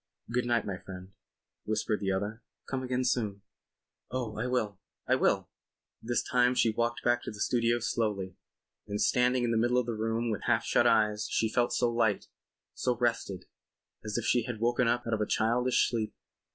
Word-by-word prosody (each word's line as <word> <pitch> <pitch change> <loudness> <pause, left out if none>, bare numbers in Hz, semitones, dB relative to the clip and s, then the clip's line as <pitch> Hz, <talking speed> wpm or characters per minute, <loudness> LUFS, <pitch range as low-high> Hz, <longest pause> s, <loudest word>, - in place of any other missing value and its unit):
"Good 125 0 +1
night, 120 -2 +1
my 95 -3 -4
friend," 95 0 -10 0.5
whispered 110 0 -1
the 95 -1 -1
other. 105 +4 -2 0.3
"Come 130 -1 -2
again 130 0 -1
soon." 105 -6 -1 0.7
"Oh, 120 -4 -3
I 110 +4 -2
will. 110 -6 -1 0.3
I - - +3
will." - - +2 0.5
This 120 0 0
time 125 0 +2
she 115 - +3
walked 120 +1 -1
back 120 0 +2
to - - -6
the 105 - -9
studio 120 +1 +2
slowly, 105 -5 -2 0.5
and 105 0 -3
standing 125 +1 +3
in 120 - +1
the 115 - +2
middle 120 +2 +2
of 125 - +2
the 120 - -2
room 115 +1 -1
with 105 - -3
half - - +2
shut - - +3
eyes 105 -1 +2
she 110 -1 0
felt 120 -1 +2
so 120 -1 +1
light, 115 -4 +1 0.5
so 125 -2 -1
rested, 115 -6 -1 0.6
as 105 +1 -3
if 120 - -2
she 120 - +3
had 120 -3 -5
woken 120 +1 +2
up 120 +1 +1
out 115 - -2
of 110 - 0
a 105 - 0
childish 120 +3 +2
sleep. 110 -3 -3
115 Hz, 190 wpm, -30 LUFS, 105-120 Hz, 0.7 s, I